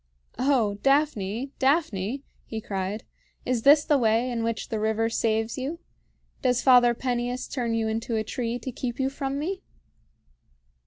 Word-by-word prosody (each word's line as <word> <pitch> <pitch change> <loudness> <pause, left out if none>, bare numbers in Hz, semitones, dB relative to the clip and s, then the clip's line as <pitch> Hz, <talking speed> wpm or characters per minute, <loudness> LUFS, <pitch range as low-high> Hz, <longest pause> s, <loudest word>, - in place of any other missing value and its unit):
"O 240 -7 +2
Daphne! 270 -4 +1
Daphne!" 265 - +1 0.2
he 225 - -4
cried, 195 0 -3 0.4
"is 250 -2 0
this 290 +4 +6
the 295 -2 +3
way 230 +2 +2
in 235 -1 -2
which 230 -1 -2
the 220 - -2
river 220 +1 +1
saves 225 +1 0
you? 280 +6 -3 0.6
Does 250 -2 +2
Father 245 -2 +6
Peneus 245 0 -2
turn 235 -4 -2
you 225 -1 0
into 225 +1 -2
a 220 - 0
tree 235 +1 -3
to 255 +2 -6
keep 240 0 -4
you 265 0 +1
from 275 0 -3
me?" 370 +6 -3
240 Hz, 155 wpm, -26 LUFS, 220-270 Hz, 0.6 s, this